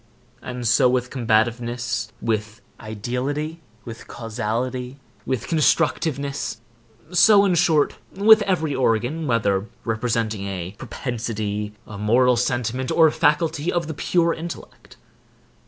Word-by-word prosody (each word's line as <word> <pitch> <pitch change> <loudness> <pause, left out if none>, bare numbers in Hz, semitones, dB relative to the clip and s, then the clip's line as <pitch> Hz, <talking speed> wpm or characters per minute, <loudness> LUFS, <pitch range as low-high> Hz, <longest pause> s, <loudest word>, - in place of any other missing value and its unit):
And 125 -1 -4
so 115 +2 +4
with 125 0 -1
combativeness, 120 -1 0
with 110 0 -2 0.2
ideality, 125 +9 -3 0.3
with 115 -1 -9
causality, 120 +3 -4 0.3
with 130 -3 -2
constructiveness,—so, 140 - +1
in 190 - +2
short, 160 -3 +2 0.2
with 215 +3 +7
every 165 -7 0
organ, 130 +5 0
whether 105 -4 +1 0.2
representing 110 -3 -1
a 90 -2 -5
propensity, 110 -4 -4
a 100 -2 -9
moral 125 +4 +3
sentiment, 125 +1 -1
or 165 - +5
a 155 - +4
faculty 155 +2 +1
of 175 -1 -1
the 160 - -5
pure 170 +2 +1
intellect. 170 +1 -9
125 Hz, 110 wpm, -22 LUFS, 110-150 Hz, 0.3 s, with